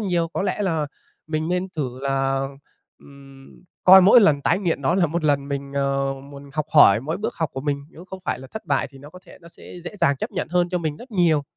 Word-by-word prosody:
nhiều. 175 -5 0
Có - - -2
lẽ 200 +1 -1
là, 165 -6 0 0.4
mình 155 0 -2
nên 180 +1 -1
thử 130 -4 -3
là, 135 0 0 0.5
ừm, 135 -1 -16 0.2
coi 190 +1 +9
mỗi 205 +6 +7
lần 150 -9 +4
tái 170 - +2
nghiện 170 -7 -2
nó 165 +6 +2
là 185 -3 +3
một 165 +1 -3
lần 140 -1 +1
mình, 140 0 -5
ờ, 140 0 0
muốn 140 0 -12
học 155 -1 -2
hỏi 115 -10 +6
mỗi 155 +6 -3
bước 205 - -4
học 160 -4 -2
của 135 - -5
mình, 140 0 -3
nếu 170 - -13
không 190 0 -9
phải - - -2
là 130 - -10
thất 220 - -8
bại 140 -1 0
thì 135 - -15
nó 145 +2 -13
có 180 - -13
thể - - -15
nó 170 - -14
sẽ 170 - -14
dễ 180 - -7
dàng 140 0 +3
chấp 220 - -4
nhận 185 - -4
hơn 175 0 +1
cho 180 - -1
mình 155 -3 -3
rất 245 +9 -13
nhiều. 170 -7 +2
155 Hz, 255 wpm, -22 LUFS, 140-180 Hz, 0.5 s, coi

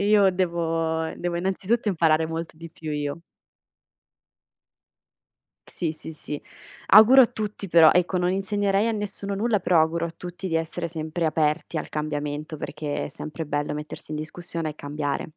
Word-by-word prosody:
io 205 -2 +6
devo 165 -3 0
devo 175 -1 -2
innanzitutto 195 +5 0
imparare 160 -4 +3
molto 165 0 -5
di 165 0 -10
più, 160 -1 -7
io. 145 +2 -3 2.5
Sì, 165 -3 -2
sì, 160 0 -9
sì. 150 -1 -6 0.4
Auguro 225 +6 +9
a 240 - +5
tutti 210 -3 -5
però 165 -2 +7
ecco 180 +1 +2
non 180 0 +1
insegnerei 200 +2 +1
a 230 - +1
nessuno 200 -1 -3
nulla, 210 0 +1
però 170 -2 +4
auguro 165 +1 +1
a - - -6
tutti 180 +2 -6
di 165 - +1
essere 165 +1 -2
sempre 160 +1 -3
aperti 155 +1 0
al - - -3
cambiamento, 150 0 -3
perché 150 0 -4
è - - -8
sempre 155 +2 -6
bello 145 0 -2
mettersi 150 0 -7
in - - -2
discussione 165 0 -4
e - - -10
cambiare. 145 -1 -3
165 Hz, 160 wpm, -25 LUFS, 155-190 Hz, 2.5 s, Auguro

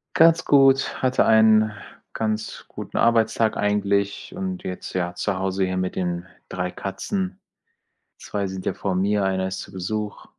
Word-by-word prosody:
Ganz 165 +1 +5
gut, 135 -1 +4
hatte 130 0 +3
einen 110 -1 +5 0.4
ganz 110 0 -3
guten - - -7
Arbeitstag 115 -1 +2
eigentlich 100 - 0
und 185 0 -4
jetzt, 90 0 -6
ja, 90 -1 -2
zu 95 -1 -2
Hause 95 0 0
hier 95 0 -2
mit 95 0 -2
den 90 0 -2 0.2
3 90 0 -3
Katzen. 190 - -4 0.8
2 100 -1 -3
sind 95 0 -6
ja - - 0
vor 95 -2 -2
mir, 100 +2 +1
einer 95 -1 0
ist 95 - -5
zu - - -9
Besuch. 105 +3 -4
105 Hz, 155 wpm, -23 LUFS, 95-115 Hz, 0.8 s, Ganz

